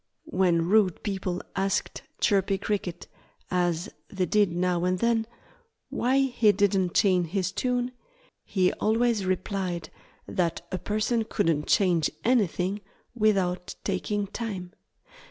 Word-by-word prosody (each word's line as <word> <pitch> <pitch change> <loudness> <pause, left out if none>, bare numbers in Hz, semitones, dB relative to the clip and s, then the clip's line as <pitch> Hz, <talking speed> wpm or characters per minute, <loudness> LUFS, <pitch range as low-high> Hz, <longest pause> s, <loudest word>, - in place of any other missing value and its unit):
When 175 -5 +3
rude 195 -3 +3
people 190 -3 -3
asked 195 0 -1 0.2
Chirpy 195 -1 +2
Cricket 190 -4 -3 0.5
as 175 -2 0 0.2
they 190 -2 -1
did 205 -1 +3
now 175 0 0
and 180 0 +1
then 230 +1 +1 0.6
why 255 +3 +1
he 240 -5 +3
didn't 195 -3 +1
change 180 -4 +3
his 185 +1 -1
tune, 250 +3 -1 0.5
he 185 -2 +1
always 220 -2 +1
replied 185 -3 -2 0.4
that 170 -1 -1
a 185 - -2
person 215 +4 0
couldn't 160 -8 0
change 175 -6 +3 0.2
anything 205 -4 +1 0.3
without 195 -5 +1
taking 205 +1 -1
time. 200 -4 -5
190 Hz, 120 wpm, -27 LUFS, 180-215 Hz, 0.6 s, When